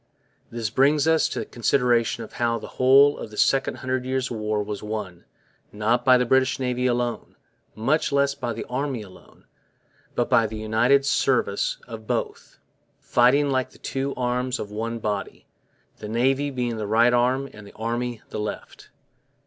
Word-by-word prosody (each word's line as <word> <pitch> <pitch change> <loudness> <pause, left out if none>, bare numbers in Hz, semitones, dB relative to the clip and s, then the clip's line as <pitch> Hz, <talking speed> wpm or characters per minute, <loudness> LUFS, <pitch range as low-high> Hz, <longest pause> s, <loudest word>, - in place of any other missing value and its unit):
This 115 -2 -4
brings 140 +4 +3
us 160 -1 +3
to - - -5
the - - -2
consideration 120 -1 +1
of 110 - -12
how 115 -1 0
the 110 - -8
whole 140 +3 +6
of - - -7
the 105 - -12
Second 135 0 +2
Hundred 130 0 -1
Years' 130 0 -2
War 105 -2 -1
was 105 -1 -6
won, 105 -5 -6 0.5
not 110 +4 0
by 130 0 +6
the 125 - +1
British 130 +2 +2
Navy 125 -1 0
alone, 120 -1 -2 0.4
much 140 +9 0
less 140 0 +2
by 130 -4 -4
the 115 - -5
Army 130 -2 -3
alone, 95 -2 -17 0.7
but - - +1
by 115 -1 +3
the 110 0 -7
united 115 +6 +2
service 130 -7 +1
of 110 -2 -9
both, - - -4 0.4
fighting 140 +4 +3
like 130 -1 0
the - - -19
two 135 +1 -3
arms 125 +1 -1
of 105 - -6
one 115 +2 -3
body, 105 -3 -4 0.5
the 105 - -8
Navy 135 +5 +1
being 125 -4 -3
the 105 -1 -4
right 115 +3 +4
arm 130 +3 +2
and 105 -1 -12
the - - -16
Army 120 +1 -3
the - - -4
left. 105 - -7
120 Hz, 175 wpm, -24 LUFS, 110-130 Hz, 0.7 s, whole